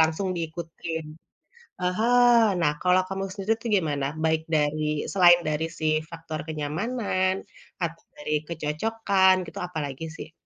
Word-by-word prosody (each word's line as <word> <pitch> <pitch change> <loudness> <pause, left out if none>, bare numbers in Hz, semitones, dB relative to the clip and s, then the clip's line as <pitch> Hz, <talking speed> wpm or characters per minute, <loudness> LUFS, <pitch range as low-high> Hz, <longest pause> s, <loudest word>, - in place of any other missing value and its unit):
langsung 160 +4 +2
diikutin. 165 0 -5 0.8
Heeh, 235 +6 +4 0.2
nah, 150 -3 +3
kalau 185 +1 +4
kamu 195 0 -2
sendiri 200 +3 0
tuh 235 - -3
gimana? 145 -6 0 0.2
Baik 160 0 +2
dari 155 0 +1 0.3
selain 175 -2 +7
dari 155 +1 0
si 155 - -1 0.2
faktor 165 -2 -6
kenyamanan, 185 +5 -1 0.5
atau 165 -1 -3
dari 150 +1 -5 0.2
kecocokan 190 +5 +2
gitu, - - -9
apalagi 150 -4 -5
sih? - - -9
170 Hz, 125 wpm, -26 LUFS, 155-190 Hz, 0.8 s, selain